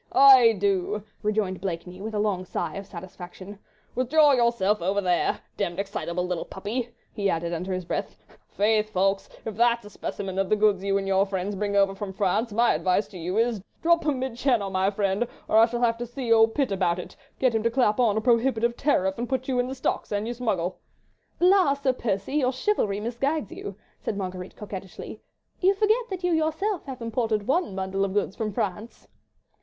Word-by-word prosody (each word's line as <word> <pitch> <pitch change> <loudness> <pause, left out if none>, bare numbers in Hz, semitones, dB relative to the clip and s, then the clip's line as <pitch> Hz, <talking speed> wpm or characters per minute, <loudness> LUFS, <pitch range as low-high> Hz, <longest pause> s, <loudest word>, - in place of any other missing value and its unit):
"Aye, 260 -4 +8
do!" 200 0 0 0.2
rejoined 210 -4 -1
Blakeney, 180 0 -5
with 220 +1 -5
a - - 0
long 205 -3 0
sigh 170 -3 -3
of 195 0 -7
satisfaction, 185 +2 -10 0.3
"withdraw 290 +4 +4
yourself 235 -6 +2
over 195 +4 +1
there. 180 -3 +1 0.2
Demmed 175 0 -2
excitable 185 -3 -3
little 180 -2 -2
puppy," 230 +5 -4 0.2
he 200 -2 0
added 170 0 -1
under 180 +3 -3
his 185 -1 -3
breath. - - -3 0.3
"Faith, 215 +1 +1
Ffoulkes, 195 0 0 0.2
if 220 - -3
that's 235 0 +2
a 205 - -11
specimen 195 -1 -4
of 195 - 0
the 215 - +4
goods 205 -2 +2
you 195 0 +1
and 195 0 -3
your 195 +1 +3
friends 195 +1 -3
bring 200 +1 -2
over 195 -1 +4
from 195 -1 -6
France, 205 +4 0
my 235 +3 +3
advice 180 +6 +1
to 185 - -10
you 180 +4 -3
is, 230 -3 +1 0.2
drop 340 0 +4
'em 290 -3 +1
'mid 255 -2 -3
Channel, 240 -7 +1
my 190 +1 +2
friend, 200 +2 0 0.2
or 215 - +3
I 225 +1 +7
shall 240 0 -3
have 230 -1 +2
to 240 - -4
see 240 -1 0
old 225 0 +4
Pitt 275 -6 +1
about 180 -3 +1
it, 180 - -8 0.2
get 255 -3 +2
him 225 - +1
to 230 - +2
clap 235 -2 +2
on 220 -4 +3
a - - +1
prohibitive 235 0 +2
tariff, 190 -9 +1
and 240 - -3
put 260 -1 -1
you 255 -2 0
in 245 - +1
the 265 - -5
stocks 260 - -2
an 205 +1 -1
you 235 - -3
smuggle." 200 -8 -2 0.6
"La, 365 -5 +5
Sir 280 -2 0
Percy, 220 +3 -2
your 255 -3 +2
chivalry 255 - 0
misguides 240 +4 -2
you," 200 - -7 0.2
said 205 - -3
Marguerite, 185 -1 -5
coquettishly, 195 -3 -8 0.4
"you 385 +2 +3
forget 435 +4 +2
that 375 -2 -5
you 355 - +1
yourself 320 +5 0
have 260 -4 -7
imported 225 -2 -1
one 275 - 0
bundle 190 0 -1
of 195 -1 -1
goods 200 -2 0
from 215 -2 -2
France." 210 +1 -4
210 Hz, 205 wpm, -26 LUFS, 195-245 Hz, 0.6 s, Aye